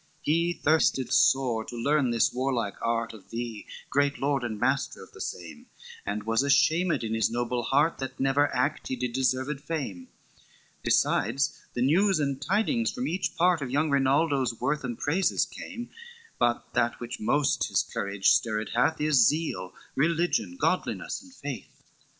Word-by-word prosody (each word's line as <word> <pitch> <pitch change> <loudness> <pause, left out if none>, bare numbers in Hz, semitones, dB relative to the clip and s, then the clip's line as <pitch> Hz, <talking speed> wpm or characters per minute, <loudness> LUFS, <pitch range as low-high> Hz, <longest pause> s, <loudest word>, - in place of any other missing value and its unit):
VII - - +2
"He 170 +1 +1
thirsted 145 -5 +2
sore 135 -6 +3
to - - -8
learn 140 +2 +1
this 115 -1 +2
warlike 125 -5 -1
art 115 0 -1
Of 110 - -14
thee, 115 -2 -5 0.2
great 140 0 +2
lord 140 -2 0
and 110 -3 -4
master 130 +3 0
of - - -16
the - - -11
same; 85 -2 -7 0.4
And 105 +1 -2
was 115 +2 +1
ashamed 155 +2 +3
in 110 0 -2
his 110 -2 +2
noble 120 +1 -1
heart, 145 +7 +2
That 135 -1 -6
never 140 +2 +2
act 140 +5 -1
he 130 - -2
did 125 -1 -3
deserved 130 +2 0
fame; 135 - -4 0.7
Besides, 135 +7 +1
the 120 - +1
news 185 +7 +3
and 140 -2 -1
tidings 220 - +1
from 255 0 -3
each 185 +3 -2
part 175 -1 +3
Of 135 - -3
young 145 +3 +1
Rinaldo's 135 -3 +2
worth 140 +4 -1
and 120 -3 -4
praises 180 +6 +1
came: 240 0 -8 0.5
But 120 0 0
that 120 -1 +1
which 120 +1 -6
most 140 +6 +1
his - - +1
courage 100 -1 0
stirred 110 -1 +1
hath, 160 +7 +2
Is 150 -6 +5
zeal, 145 - -1 0.2
religion, 155 - 0
godliness, - - -1
and - - -16
faith. - - -8
135 Hz, 165 wpm, -27 LUFS, 115-150 Hz, 0.7 s, Is